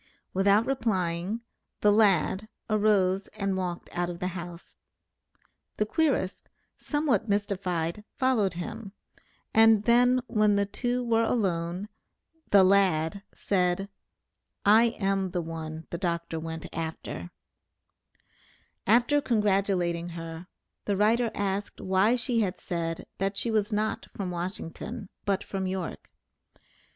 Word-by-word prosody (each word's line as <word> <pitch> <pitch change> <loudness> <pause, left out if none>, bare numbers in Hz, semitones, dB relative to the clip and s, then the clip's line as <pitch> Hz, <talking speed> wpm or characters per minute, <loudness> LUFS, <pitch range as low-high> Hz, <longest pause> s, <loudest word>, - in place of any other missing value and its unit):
Without 200 +3 +4
replying 200 -5 -1 0.4
"the 210 - +5
lad" 205 0 +3 0.2
arose 200 -2 +2
and 195 -2 0
walked 180 -2 -3
out 175 0 0
of 175 - -5
the 180 +1 -2
house. 175 -1 -8 1.0
The 210 - +2
querist, 275 - 0 0.3
somewhat 275 -8 0
mystified, 190 -3 -1
followed 235 -9 +2
him, 210 +3 -6 0.6
and 225 -1 +6
then 245 +2 +4
when 215 -3 +3
the 200 0 +2
two 245 +4 -2
were 230 -1 +2
alone, 185 -5 0 0.6
"the 200 -2 +7
lad" 185 -2 +3
said, 185 0 0 0.8
"I 220 +3 +7
am 195 -1 +1
the 175 0 -2
one 160 -1 -6
the 170 - -4
Dr. 170 -3 -2
went 160 0 -6
after." 160 - -5 1.6
After 240 +7 +4
congratulating 195 -7 +1
her, 165 +1 -7 0.4
the 200 -2 0
writer 225 +3 +3
asked 200 0 -2
why 190 +5 +3
she 245 -1 +1
had 195 -4 0
said, 165 -2 -3
that 195 +1 -1
she 235 - -1
was 215 0 +1
not 215 +1 -1
from 190 -3 -3
Washington, 185 +4 -5 0.2
but 200 -1 0
from 190 -1 -3
York. 185 -2 -4
195 Hz, 120 wpm, -28 LUFS, 175-215 Hz, 1.6 s, the